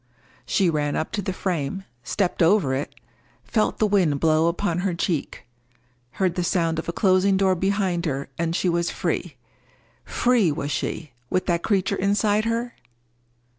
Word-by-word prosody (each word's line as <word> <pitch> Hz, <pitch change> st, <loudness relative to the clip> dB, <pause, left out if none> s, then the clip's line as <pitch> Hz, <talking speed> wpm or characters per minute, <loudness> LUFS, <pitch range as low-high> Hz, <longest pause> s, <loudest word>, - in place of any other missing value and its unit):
She 190 Hz, -, +2 dB
ran 150 Hz, -3 st, 0 dB
up 160 Hz, -, -2 dB
to 210 Hz, -, -2 dB
the 190 Hz, -, -2 dB
frame, 185 Hz, -1 st, -2 dB, 0.2 s
stepped 185 Hz, +8 st, -1 dB
over 165 Hz, -5 st, +4 dB
it, 135 Hz, +2 st, -3 dB, 0.5 s
felt 215 Hz, -2 st, 0 dB
the 215 Hz, -, +2 dB
wind 185 Hz, -9 st, +2 dB
blow 160 Hz, +1 st, +3 dB
upon 175 Hz, 0 st, 0 dB
her 180 Hz, -1 st, -1 dB
cheek, 170 Hz, -3 st, -2 dB, 0.7 s
heard 185 Hz, -3 st, 0 dB
the 180 Hz, -, -1 dB
sound 165 Hz, -2 st, +1 dB
of 165 Hz, -, -5 dB
a -, -, +1 dB
closing 190 Hz, +1 st, +3 dB
door 190 Hz, -1 st, +3 dB
behind 185 Hz, -2 st, 0 dB
her, 140 Hz, -1 st, -2 dB
and 170 Hz, +2 st, -1 dB
was 170 Hz, -1 st, +1 dB
free. -, -, -2 dB, 0.7 s
Free 240 Hz, -9 st, +2 dB
was 145 Hz, 0 st, -3 dB
she, 150 Hz, +1 st, -3 dB, 0.2 s
with 185 Hz, -, 0 dB
that 170 Hz, -2 st, +1 dB
creature 200 Hz, 0 st, +1 dB
inside 205 Hz, +2 st, +2 dB
her? 235 Hz, +1 st, -1 dB
180 Hz, 160 wpm, -24 LUFS, 165-200 Hz, 0.7 s, over